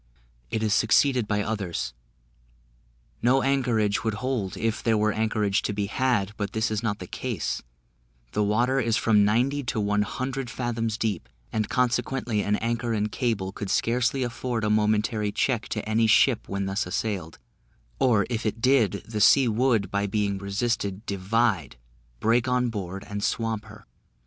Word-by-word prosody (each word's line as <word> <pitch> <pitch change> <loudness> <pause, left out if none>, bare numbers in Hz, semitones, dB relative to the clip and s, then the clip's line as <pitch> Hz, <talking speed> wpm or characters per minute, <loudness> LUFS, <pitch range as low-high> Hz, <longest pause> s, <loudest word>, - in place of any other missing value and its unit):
It 110 - -1
is 105 -2 +2
succeeded 120 +2 +3
by 105 -1 0
others. 100 - -3 1.3
No 130 +3 +3
anchorage 120 -7 +1
would 110 -2 -1
hold 120 -5 -2
if 115 0 -1
there 115 -2 +2
were 105 0 +2
anchorage 110 -2 +1
to - - -2
be 100 0 -1
had; 105 -2 0
but 100 -1 -3
this 110 0 0
is 110 0 -1
not 110 -3 -1
the 90 - -8
case; - - -3 0.7
the - - 0
water 120 +6 +2
is 115 -3 +1
from 105 -3 +4
ninety 125 +8 +2
to 120 - -1
one 105 0 +1
hundred 130 +4 -3
fathoms 115 -3 -2
deep, 110 -6 -2 0.2
and 110 -1 -1
consequently 125 -2 0
an 105 +1 +1
anchor 115 +1 -1
and 105 -1 -1
cable 110 -7 -1
could 100 0 -6
scarcely 125 +5 +1
afford 120 -1 -3
a 105 - +1
momentary 105 0 +1
check 120 +1 0
to 105 -1 -3
any 110 +1 +2
ship 115 +2 +3
when 100 0 -2
thus 95 0 -1
assailed; 90 -4 -3 0.6
or, 110 -6 +3
if 120 -1 -3
it 110 +1 -2
did, 115 -5 +2
the 110 -2 -3
sea 130 +4 +6
would, 115 -2 +1
by 100 0 0
being 100 -1 -1
resisted, 100 0 -2
divide, 100 - 0 0.4
break 115 - +2
on 125 -1 +1
board, 100 -3 -5
and 100 0 -4
swamp 115 -3 -1
her. 105 0 -14
110 Hz, 165 wpm, -26 LUFS, 105-120 Hz, 1.3 s, sea